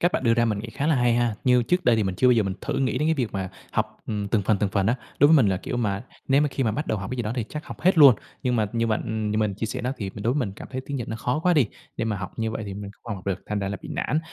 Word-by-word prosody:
cách 175 +1 +2
bạn - - 0
đưa 115 - +4
ra 120 0 +3
mình 110 -3 0
nghĩ 115 +3 -6
khá 140 +5 -2
là 160 - +4
hay 120 -2 +3
ha. 120 -2 +1
Như 125 -1 +5
trước 180 +8 0
đây 120 -5 +5
thì 110 - +2
mình 95 -2 -1
chưa 125 - +2
bao - - +7
giờ 115 -2 +3
mình 95 -2 -2
thử - - -3
nghĩ 130 -2 0
đến 150 +3 +1
cái 160 - +3
việc 125 -7 -2
mà 95 -2 -3 0.2
học, - - -1
ừm, 105 -2 -2
từng 105 0 +1
phần, 105 +1 +2
từng 105 -1 +1
phần 100 0 +1
á. 115 - +3 0.2
Đối 145 - +7
với 160 - +7
mình 115 -7 +5
là, 95 - +1
kiểu 115 - -4
mà, 105 -4 -1 0.3
nếu 135 +1 +5
mà 150 - +2
khi 135 -1 -2
mà 110 - +1
bắt 150 +8 -3
đầu 110 - -1
học 95 -1 -6
cái 130 - -3
gì 120 - -1
đó 105 0 -2
thì 120 -3 -1
chắc 150 +1 -6
học - - -9
hết 185 -1 +3
luôn. 140 -5 +9 0.3
Nhưng 125 -1 +1
mà 110 - +2
như 115 0 +1
bạn 110 -1 0
ừm, 110 -1 -2
như 105 - 0
mình 105 -2 +1
chia 110 +3 -3
sẻ - - -4
đó, 125 +2 -1
thì 100 -3 -4
mình 105 - -7
đối 120 +4 +1
mình 125 -10 -1
cảm - - -9
thấy 130 0 -3
tiếng 140 - -3
Nhật 120 - -4
nó 110 - -3
khó 125 +5 -1
quá 180 +2 +3
đi. 145 -7 +4 0.3
Để - - -1
mà 110 -2 -1
học 90 -2 -6
như 110 0 0
vậy 110 0 -4
thì 100 - -5
mình 100 0 -7
không 115 -3 -4
học 95 -1 -11
được, 95 -1 0
thành 105 - -2
ra 95 -1 -2
là 100 - -3
bị - - -8
nản. 150 - 0
115 Hz, 375 wpm, -25 LUFS, 105-130 Hz, 0.3 s, luôn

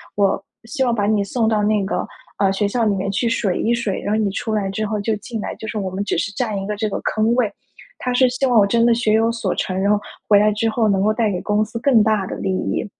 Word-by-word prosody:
我 200 -2 +1 0.2
希 265 +4 -2
望 245 -2 +1
把 205 -3 0
你 210 -1 +2
送 220 +2 0
到 215 -2 +1
那 210 -1 +2
个， 190 - -2 0.3
呃， 195 -1 +2
学 205 +1 0
校 230 +3 0
里 210 - +2
面 195 +1 -2
去 235 +5 0
水 215 -5 0
一 235 - +1
水， 235 -5 -1
然 205 - -2
后 215 - +1
你 205 - +1
出 220 +3 -3
来 205 -2 0
之 215 +3 -2
后 210 0 -2
就 220 +1 0
进 220 +2 -6
来， - - -5
就 220 - -8
是 215 0 -3
我 190 -2 -2
们 190 +2 -3
只 205 - -1
是 200 - -1
占 215 -3 -2
一 195 - -5
个 210 - -2
这 215 0 -1
个 - - -4
坑 220 +2 +1
位。 240 -4 +1 0.5
它 250 - -2
是 255 +1 +4
希 255 +2 -1
望 245 -4 +4
我 200 - +4
真 230 +3 +2
的 235 - +5
学 230 -2 +1
有 225 +1 +3
所 230 - -2
成， 185 0 -2
然 200 +1 +1
后 210 - +4 0.3
回 205 - +6
来 210 +1 +4
之 225 +2 0
后 220 0 +1
能 195 -1 +2
够 215 +2 +2
带 220 -2 +1
给 180 -2 -3
公 210 0 +1
司 225 +2 -6
更 240 -3 +4
大 210 -3 +1
的 - - -5
利 190 - -2
益。 185 - -2
215 Hz, 320 characters per minute, -20 LUFS, 200-230 Hz, 0.5 s, 回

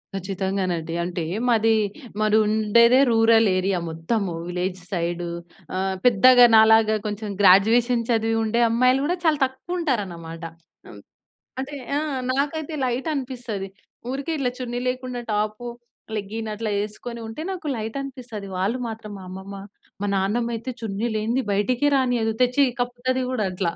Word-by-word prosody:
ఖచ్చితంగానండి. 190 -3 -2
అంటే 175 -1 -3 0.3
మాది, 225 -1 +4 0.5
మాది 215 0 +3
ఉండేదే 220 +4 +4
రూరల్ 225 0 +5
ఏరియా 185 0 0
మొత్తము. 175 +5 -2 0.2
విలేజ్ 180 +1 -3
సైడ్ 175 -1 -2 0.5
ఆహ్, 190 0 -1
పెద్దగా 245 +2 +7
నాలాగా 220 0 +6
కొంచెం 210 0 -4
గ్రాడ్యుయేషన్ 230 +5 +5
చదివి 225 -1 +1
ఉండే 225 +2 +1
అమ్మాయిలు 255 +3 +3
గూడా 350 +4 0
చాలా 310 -3 +3
తక్కువ 265 +7 -6
ఉంటారనమాట. 175 - -3 0.5
అమ్ - - -12 0.6
అంటే 275 +2 -6 0.2
ఆ! - - +2 0.3
నాకైతే 295 +3 -2
లైట్ 255 +4 -1
అనిపిస్తది. 245 -7 -4 0.4
ఊరికే 275 +5 -3
ఇట్ల 265 -3 0
చున్నీ 245 -1 -4
లేకుండా 250 -1 -3
టాపు, 215 +3 -2 0.5
లెగ్గిన్ 215 +2 -4
అట్లా 215 0 -3
యేసుకొని 230 +3 -6
ఉంటే, 225 +8 -6
నాకు 360 -4 -6
లైట్ 220 +1 -5
అనిపిస్తది. 250 -6 -7
వాళ్ళు 200 +7 0
మాత్రం 220 -2 -7
మా - - -10
అమ్మమ్మ. 190 +1 -8 0.4
మా - - 0
నాన్నమ్మ 215 +5 0
అయితే 230 +3 -6
చున్నీ 220 0 -3
లేనిది, 230 +5 0
బయటికే 245 +8 +1
రానీయదు. 245 -4 +1
తెచ్చి 250 +3 +4 0.2
కప్పుతది 245 +1 -1
గూడా 230 -6 0
అట్ల. 185 0 -2
225 Hz, 140 wpm, -23 LUFS, 195-250 Hz, 0.6 s, పెద్దగా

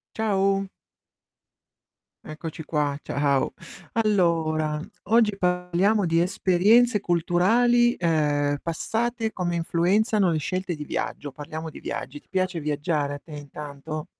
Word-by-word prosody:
Ciao. 195 -2 +1 1.6
Eccoci 155 +1 -7
qua, 150 -2 -1
ciao. 140 -1 0 0.4
Allora, 165 -8 +1 0.3
oggi 220 -1 +3
parliamo 180 +3 +1
di 165 0 +2
esperienze 200 +6 +3
culturali, 225 +8 +3
ehm, 145 -4 +1
passate, 225 +7 -2
come 175 -2 -2
influenzano 190 +4 +2
le 160 - +1
scelte 185 +3 -3
di 150 - -6
viaggio. 145 -1 -4
Parliamo 155 +3 -7
di 155 - -10
viaggi. 145 - -5
Ti - - -37
piace 185 -3 -1
viaggiare 145 -1 -1
a - - -6
te 155 - -15
intanto? 150 +1 -7
175 Hz, 115 wpm, -25 LUFS, 150-200 Hz, 1.6 s, oggi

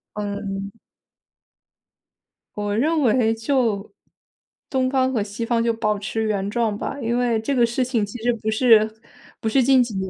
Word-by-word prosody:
嗯。 200 -1 -4 1.8
我 205 0 -2
认 310 +7 +1
为 225 -3 +3
就 225 - -1 0.8
东 260 -2 +1
方 260 0 +1
和 225 - +1
西 210 +3 -5
方 230 -1 +1
就 230 -1 +1
保 215 -2 0
持 220 +2 -3
原 200 -2 -1
状 220 -2 0
吧， 280 - -4
因 235 0 0
为 240 -2 +1
这 265 +5 -2
个 240 - +4
事 235 +2 -1
情 235 -4 0
其 220 +3 -9
实 245 0 +2
不 220 -1 -4
是 220 -1 +4 0.5
不 220 - -3
是 260 +4 +3
近 265 0 +5
几 235 -3 -6
年 190 0 -3
225 Hz, 185 characters per minute, -22 LUFS, 210-250 Hz, 1.8 s, 近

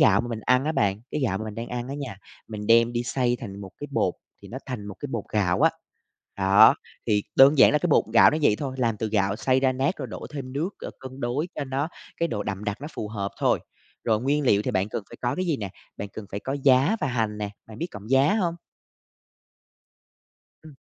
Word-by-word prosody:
gạo 100 -1 +6
mà 120 - -5
mình 115 -2 -4
ăn 125 +4 +2
á 155 - 0
bạn, 100 -7 +1
cái - - -2
gạo 105 -8 0
mà 110 - -5
mình 110 -1 -6
đang 115 +2 -5
ăn 120 0 -4
á 140 - -4
nha, 140 -8 -6 0.3
mình 105 -1 -6
đem 115 +1 +5
đi 120 0 -1
xay 120 0 0
thành 100 -3 -7
một 95 -2 -8
cái 145 - -5
bột - - +1 0.3
thì - - -11
nó 125 - -6
thành 125 -6 -5
một 100 - -7
cái - - -3
bột 115 -4 -2
gạo 90 -4 +1
á. - - +6 0.7
Đó, 100 +3 +7 0.3
thì 105 -1 +2
đơn 140 +2 +7
giản - - +8
là 150 - +4
cái 175 - -1
bột 150 - +4
gạo 115 - +8
nó 155 - -1
vậy 105 -7 +4
thôi, 135 -2 -4
làm 115 -3 +1
từ 110 - -2
gạo 100 -1 +1
xay 130 +3 +2
ra 130 -1 +3
nát 135 +8 0
rồi - - -4
đổ - - -7
thêm 135 -3 -6
nước, 155 +7 -1
ờ, - - -5
cân 130 0 -9
đối 135 +7 -1
cho 145 - -3
nó 135 +3 -2 0.3
cái 170 - 0
độ 105 -7 -2
đậm 100 0 -4
đặc 105 +1 -3
nó 145 - -6
phù 105 - -4
hợp 100 -2 -3
thôi. - - +2 0.4
Rồi 110 -2 +2
nguyên 145 +4 +1
liệu 100 -3 +4
thì - - -1
bạn 95 +2 0
cần 110 - -4
phải - - -10
có 120 - 0
cái 185 - -1
gì 160 -4 +1
nè? 100 -5 -5 0.3
Bạn 100 - -5
cần 110 - -8
phải 100 - -4
có 135 - -4
giá 135 - +5
và - - 0
hành 110 -4 -1
nè, 105 -1 -3 0.2
bạn 110 0 -11
biết 170 - -2
cọng 105 +2 -10
giá 135 +7 +4
hông? 175 -6 0 2.1
Ừm. 155 -3 -14
120 Hz, 255 wpm, -25 LUFS, 105-135 Hz, 2.1 s, giản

